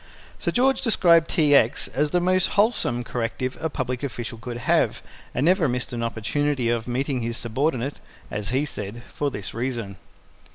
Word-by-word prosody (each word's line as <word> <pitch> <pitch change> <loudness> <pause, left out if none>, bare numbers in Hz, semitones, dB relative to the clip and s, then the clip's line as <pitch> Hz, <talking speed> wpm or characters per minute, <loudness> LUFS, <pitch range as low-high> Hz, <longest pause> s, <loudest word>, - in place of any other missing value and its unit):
Sir - - -1
George 265 +2 +2
described 170 -8 +4
T. 150 -5 +3
X. 120 -4 +4
as 150 +3 0
the 180 - +2
most 185 +1 +2
wholesome 200 - +3
corrective 120 +2 -3
a 160 - 0
public 125 -3 -3
official 120 -4 -5
could 120 0 -6
have, - - +2 0.3
and 130 - +1
never 180 -2 +4
missed 125 0 -2
an 120 - -3
opportunity 120 +3 0
of 115 -1 -1
meeting 130 +1 -1
his 115 0 -3
subordinate 130 +3 -1 0.3
(as 105 -1 -4
he 130 +4 +1
said) 110 -3 -6
for 145 - 0
this 100 -8 -5
reason. 115 -5 -3
130 Hz, 170 wpm, -24 LUFS, 115-150 Hz, 0.3 s, described